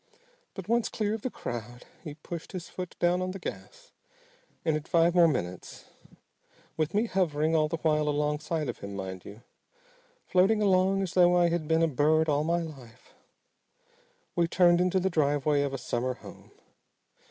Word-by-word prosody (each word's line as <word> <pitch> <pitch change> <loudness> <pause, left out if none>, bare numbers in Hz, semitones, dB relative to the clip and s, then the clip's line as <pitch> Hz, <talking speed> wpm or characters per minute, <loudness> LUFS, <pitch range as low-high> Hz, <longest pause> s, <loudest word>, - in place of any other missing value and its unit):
But 190 -3 -7
once 235 +1 +1
clear 210 -1 -2
of 220 - -4
the 255 - -2
crowd 120 - -7 0.2
he 150 -2 -7
pushed 165 +3 -8
his 180 -2 -6
foot 180 -1 -7
down 175 +1 +2
on 185 - -2
the 190 - -5
gas - - -9 0.7
and 160 -2 +2
in 155 - -2
five 165 +2 +2
more 175 -2 +6
minutes 90 - -4 0.9
with 155 +3 -2
me 215 +3 +3
hovering 165 -6 0
all 155 -1 +3
the 165 +2 -3
while 150 -2 +1
alongside 150 +1 -1
of 120 - -5
him, 100 0 -7
mind 95 -1 -6
you 105 +4 -11 0.8
floating 190 +4 +3
along 195 -1 +2
as 185 - -4
though 180 -1 +5
I 175 -1 +4
had 170 -2 -2
been 160 +1 +2
a - - +4
bird 155 +2 +2
all 145 0 +2
my 170 +2 0
life 130 -7 -12 1.2
we 170 -1 +2
turned 175 0 +4
into 185 +1 +2
the 190 +1 0
driveway 145 -2 +1
of 140 -1 -1
a 135 - -3
summer 125 0 -2
home. - - -14
160 Hz, 175 wpm, -28 LUFS, 145-180 Hz, 1.2 s, more